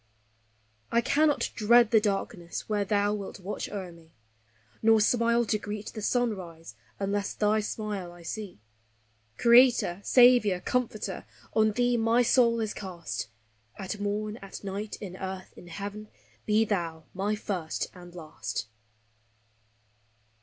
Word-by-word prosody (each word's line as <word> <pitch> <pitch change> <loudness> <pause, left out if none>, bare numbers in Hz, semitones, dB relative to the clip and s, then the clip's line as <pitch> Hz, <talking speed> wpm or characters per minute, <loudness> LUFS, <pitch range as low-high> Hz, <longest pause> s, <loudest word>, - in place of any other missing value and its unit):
I 235 - +4
cannot 295 +4 +2
dread 235 +1 +5
the 220 -2 +5
darkness 195 -3 -3
where 210 -1 0
thou 205 0 +1
wilt 200 -1 -6
watch 195 +2 -5
o'er 190 -4 -5
me, 165 -1 -18 0.7
Nor 225 0 +5
smile 235 +2 +3
to 215 -1 0
greet 210 0 -6
the 215 - -6
sunrise 190 -9 -2 0.3
unless 200 0 -1
thy 215 +1 +2
smile 210 -4 -4
I 175 0 -14
see; 195 - -6 0.8
Creator, 235 -6 +5
Saviour, 240 -7 +5
Comforter! 245 0 -2 0.3
on 215 -1 +3
thee 245 +1 +2
my 230 +2 +3
soul 235 -1 +4
is 215 -1 -2
cast; 180 - -5 0.5
At 200 +1 -5
morn, 210 +1 -2
at 195 -2 -10
night, 200 +2 -5
in 190 -3 -7
earth, 190 0 -6
in 175 - -13
heaven, 205 +4 -6 0.4
be 215 +1 +4
thou 170 -6 -2
my 200 +3 -1
First 185 -6 -3
and 175 -1 -13
Last! 120 -12 -5
210 Hz, 130 wpm, -28 LUFS, 185-225 Hz, 0.8 s, dread